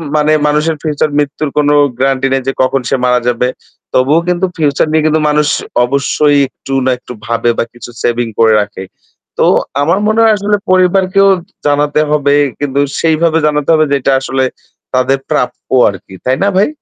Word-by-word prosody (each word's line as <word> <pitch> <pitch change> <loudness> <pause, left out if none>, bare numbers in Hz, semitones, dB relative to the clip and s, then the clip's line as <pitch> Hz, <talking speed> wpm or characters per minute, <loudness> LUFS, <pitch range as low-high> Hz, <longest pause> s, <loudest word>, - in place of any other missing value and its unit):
মানে 150 0 +2
মানুষের 150 +2 0
ফিউচার 155 -1 -1
মৃত্যুর 145 +1 -2
কোনো 145 0 +3 0.3
গ্রান্টি 135 0 +1
নাই 135 - +1
যে 135 - 0
কখন 130 +1 +1
সে 135 - +1
মারা 125 0 +2
যাবে। 125 +1 0 0.5
তবুও 140 +6 +3
কিন্তু 180 +1 +1
ফিউচার 150 -1 +1
নিয়ে 155 -1 +2
কিন্তু 155 0 +1
মানুষ 150 0 +1 0.4
অবশ্যই 140 +2 +1
একটু 135 +1 -9
না 130 - +2
একটু 125 - -11
ভাবে 115 +1 0
বা - - +1
কিছু 120 - -11
সেভিং 120 0 0
করে 110 -1 +5
রাখে। 105 -2 -6 0.5
তো - - +2 0.4
আমার 170 +7 +1
মনে 215 +1 +1
হয় 220 - +5
আসলে 205 +1 0 0.2
পরিবারকেও 185 +1 +3 0.4
জানাতে 145 +1 +1
হবে। 145 -1 +2 0.3
কিন্তু 140 -1 -2 0.2
সেইভাবে 165 0 +1
জানাতে 150 -1 -1
হবে 155 -1 +3
যে 140 - +3
এটা 135 - +1
আসলে 135 0 -1 0.5
তাদের 130 +1 +1
প্রাপ্য 135 -5 -1 0.3
আরকি। 95 -1 -10
তাই 130 +1 +1
না 200 - +2
ভাই? 200 - +3
145 Hz, 175 wpm, -12 LUFS, 130-155 Hz, 0.5 s, করে